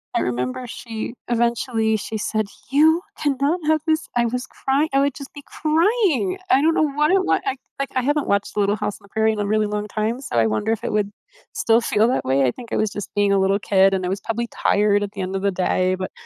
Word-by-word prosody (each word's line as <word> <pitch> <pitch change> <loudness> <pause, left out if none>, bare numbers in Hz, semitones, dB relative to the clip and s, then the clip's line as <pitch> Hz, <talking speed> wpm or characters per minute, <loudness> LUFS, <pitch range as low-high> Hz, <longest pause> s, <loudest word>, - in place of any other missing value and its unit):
I - - +3
remember 125 - -2
she 230 -1 -6 0.2
eventually, 235 -1 +1
she 220 +1 -5
said, 215 0 -1 0.2
"You 315 +4 +4 0.2
cannot 285 +4 0
have 315 0 +3
this." 315 0 +1
I 240 - +3
was 250 +2 -2
cry 275 +3 0
I 275 - +4
would 280 -1 +1
just 275 -2 -9
be 285 - -10
crying. 365 - +1
I 265 - +5
don't 320 +2 +3
know - - +3
what 300 +1 +1
it 385 0 +3
wa - - +2
I 270 -1 0 0.2
like, 275 - -1
I 255 - +2
haven't 290 +2 0
watched 200 +1 0
Little 205 0 +2
House 205 - -3
in 200 - -20
the - - -21
Prairie 220 +1 +2
in 215 - -5
a 205 - 0
really 215 +1 +2
long 210 0 -3
time, 215 +3 -2
so 270 - -6
I 115 - +4
wonder 110 - -1
if 225 - -5
it - - -2
would 210 -1 +1 0.4
still 225 0 +3
feel 220 -1 +2
that 255 - -1
way. 135 +1 +2
I 125 - +2
think 235 - -12
I - - +1
was 215 - +1
just 205 -2 -6
being 205 -1 +2
a 195 - +3
little 195 +1 +2
kid 195 -1 +3
and 185 -1 -1
I - - -1
was 195 +2 -2
probably 235 +1 -2
tired 205 -2 +2
at 200 - -4
the 195 - -5
end 190 +1 -3
of 190 - -4
the 200 - +2
day. 185 0 +1
But, 185 0 -5
220 Hz, 260 wpm, -22 LUFS, 200-275 Hz, 0.4 s, I